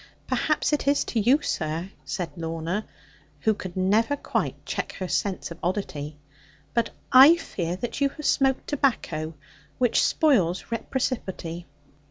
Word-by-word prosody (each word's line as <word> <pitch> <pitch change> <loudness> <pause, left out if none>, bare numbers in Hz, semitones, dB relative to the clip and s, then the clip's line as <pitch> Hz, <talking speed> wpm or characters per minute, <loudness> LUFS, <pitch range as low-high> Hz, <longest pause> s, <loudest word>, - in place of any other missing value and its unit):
'Perhaps 305 0 +1
it 290 - 0
is 285 0 +4
to 230 - -1
you, 250 +7 +4
sir,' 165 +3 -2
said 175 -4 -4
Lorna, 165 +4 -3 0.5
who 220 - +3
could 185 -3 -7
never 215 +9 +3
quite - - -2
check - - -3
her 185 - -4
sense 190 -1 -1
of 170 - -8
oddity; 155 -6 -3 0.6
'but 235 -1 +1 0.2
I 270 +6 +10
fear 175 - -3
that 240 +8 -5
you 280 - +4
have 300 +1 -9
smoked 270 -1 +2
tobacco, 170 - -1 0.4
which 245 -2 +3
spoils 205 - +2
reciprocity.' 205 -8 -3
205 Hz, 140 wpm, -26 LUFS, 170-265 Hz, 0.6 s, I